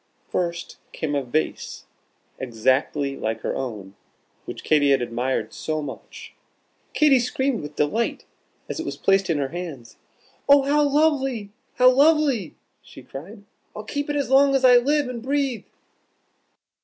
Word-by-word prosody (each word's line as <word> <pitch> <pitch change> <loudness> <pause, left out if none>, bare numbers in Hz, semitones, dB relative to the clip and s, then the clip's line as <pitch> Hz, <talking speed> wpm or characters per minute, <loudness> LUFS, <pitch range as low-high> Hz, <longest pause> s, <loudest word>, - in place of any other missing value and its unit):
First 170 -1 -3 0.2
came 150 -2 -3
a 140 - +1
vase 135 +5 -3 0.5
exactly 130 +3 0
like 110 -2 -3
her - - -3
own, 105 -7 -6 0.5
which - - -8
Katy 145 -2 +3
had 135 -1 +4
admired 120 -1 -2
so 155 0 -3
much. 145 -3 -9 0.6
Katy 290 -4 +5
screamed 255 0 -1
with 150 0 -9
delight 215 +11 -1 0.4
as - - -5
it - - -2
was - - -5
placed 195 -1 +2
in 165 - +1
her 140 -2 -1
hands: 160 -9 -8 0.5
"Oh, 280 -1 +7
how 290 +2 +2
lovely! 275 -7 +1 0.2
how 255 0 +6
lovely!" 280 - +2 0.3
she - - -14
cried. 200 +10 -10 0.3
"I'll 210 - -6
keep 285 +6 -4
it 290 - -1
as 280 -2 -1
long 275 +1 +5
as 265 -1 +3
I 250 -1 +8
live 285 +3 +1
and 245 -2 -6
breathe." 270 -3 -1
200 Hz, 150 wpm, -23 LUFS, -, 0.6 s, I